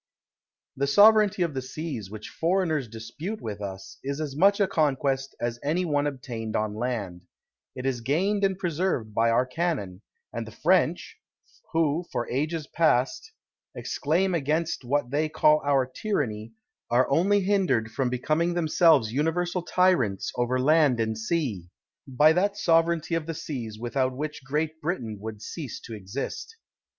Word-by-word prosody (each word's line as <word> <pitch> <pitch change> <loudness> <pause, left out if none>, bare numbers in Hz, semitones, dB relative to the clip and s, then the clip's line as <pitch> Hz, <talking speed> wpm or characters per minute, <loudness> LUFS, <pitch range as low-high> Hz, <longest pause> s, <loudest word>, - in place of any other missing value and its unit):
The 140 +1 0
sovereignty 205 +3 +6
of 165 -3 -2
the 130 - -2
seas, 130 - -6
which 110 +1 -8
foreigners 165 -6 0
dispute 120 - -6
with 105 -2 -6
us, 95 -1 -7
is 140 +2 -3
as 150 -3 -4
much 200 +6 +4
a 200 - +4
conquest 135 -4 0
as 120 0 -3
any 170 +5 0
one 145 -2 +1
obtained 115 -5 -5
on 105 -1 0
land; 105 -6 -3 0.5
it 125 - -6
is 130 -3 -1
gained 190 - 0
and 195 -1 +2
preserved 170 - -1
by 115 +2 +3
our 120 +2 +3
cannon, 130 - -2 0.3
and 115 -1 -4
the - - -9
French, 175 - +1 0.5
who, 160 0 +1
for 120 - -2
ages 150 +4 -1
past, 155 - +1 0.4
exclaim 175 +6 0
against 155 0 -1
what 125 0 -1
they 155 +2 +1
call 155 -1 +4
our 140 -2 +2
tyranny, 120 - -3 0.4
are 125 +2 +3
only 200 +7 +3
hindered 185 - +1
from 130 0 -1
becoming 155 +8 0
themselves 155 -8 +3
universal 175 +5 0
tyrants 175 - +1
over 120 +1 0
laud 145 -2 +4
and 110 -1 0
sea, 110 - -2 0.4
by 150 +4 +5
that 200 +4 +1
sovereignty 165 -3 +2
of 165 -1 -1
the 165 - -3
seas 125 -9 -5
without 130 +2 -1
which 150 -1 -5
Great 155 +4 -2
Britain 120 - -3
would 110 -1 -7
cease 145 -4 -6
to 115 - -10
exist. 110 - -6
145 Hz, 155 wpm, -26 LUFS, 120-170 Hz, 0.5 s, sovereignty